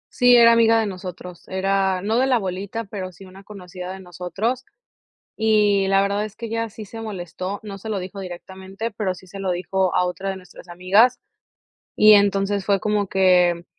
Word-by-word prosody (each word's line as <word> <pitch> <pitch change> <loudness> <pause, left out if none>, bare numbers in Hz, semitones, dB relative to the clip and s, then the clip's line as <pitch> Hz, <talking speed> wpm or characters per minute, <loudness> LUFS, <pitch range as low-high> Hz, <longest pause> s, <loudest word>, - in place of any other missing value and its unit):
Sí, 245 -1 +6
era 235 -1 +7
amiga 230 -1 +4
de 220 - 0
nosotros, 180 -2 -8
era 190 0 0
no 220 +3 +1
de 260 - +2
la 255 -2 +3
bolita, 195 +3 -4
pero 195 -3 -7
sí 185 +2 -14
una 190 +1 -14
conocida 185 -3 -9
de 190 - -8
nosotros, 190 +8 -4 0.7
y 210 -3 +2
la 195 0 +3
verdad 200 +1 -1
es 215 -1 -7
que 230 - -7
ella 230 0 -3
sí 215 +1 -10
se 225 +3 -9
molestó. 185 -2 -6
No 200 -2 -8
se 220 - -8
lo 210 - -1
dijo 190 +2 -7
directamente, 190 +4 -7
pero 200 -3 -3
sí 185 - -15
se 195 +2 -10
lo 195 -1 -2
dijo 185 +1 -1
a 180 - +3
otra 190 +2 -4
de 190 - -3
nuestras 180 -1 -14
amigas, 185 +8 +3 0.8
y 215 0 +7
entonces 200 -1 +2
fue 200 -1 +2
como 210 -1 0
que 180 -2 +3
195 Hz, 195 wpm, -22 LUFS, 185-215 Hz, 0.8 s, era